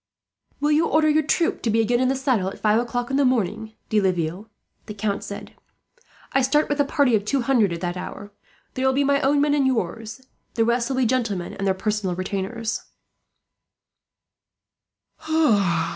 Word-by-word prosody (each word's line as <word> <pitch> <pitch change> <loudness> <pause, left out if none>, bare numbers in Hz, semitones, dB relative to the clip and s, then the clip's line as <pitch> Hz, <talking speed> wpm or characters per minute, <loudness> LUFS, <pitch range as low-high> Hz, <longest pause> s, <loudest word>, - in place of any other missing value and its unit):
"Will 295 +1 +1
you 310 +2 +3
order 310 0 +3
your 310 +1 +3
troop 335 +5 0
to 230 - -1
be 225 +1 +2
again 240 +2 +2
in 255 - +2
the 265 - +1
saddle 255 -8 0
at 195 - -5
five 215 +1 +2
o'clock 245 +1 -3
in 270 - +1
the 285 - +3
morning, 220 -3 0 0.2
De 215 -1 +2
Laville?" 185 +2 -2 0.4
the 210 - -7
Count 200 -1 -2
said. 200 - -8 0.8
"I 270 - +3
start 295 +4 +2
with 290 0 -1
a - - +5
party 280 -3 +2
of 205 - 0
two 265 +6 0
hundred 235 -7 +2
at 170 0 -5
that 175 -1 -2
hour. 205 +2 -8 0.4
There 260 - -3
will 265 - +3
be 285 - +2
my 280 0 +2
own 285 +2 +2
men 290 0 +2
and 280 -2 +2
yours. 225 0 -3 0.3
The 225 - +2
rest 235 +1 0
will 265 - -2
be 260 - +2
gentlemen 225 -7 -1
and 195 0 -3
their 190 - +2
personal 210 -2 -2
retainers." 200 +5 -3
235 Hz, 190 wpm, -23 LUFS, 205-270 Hz, 0.8 s, a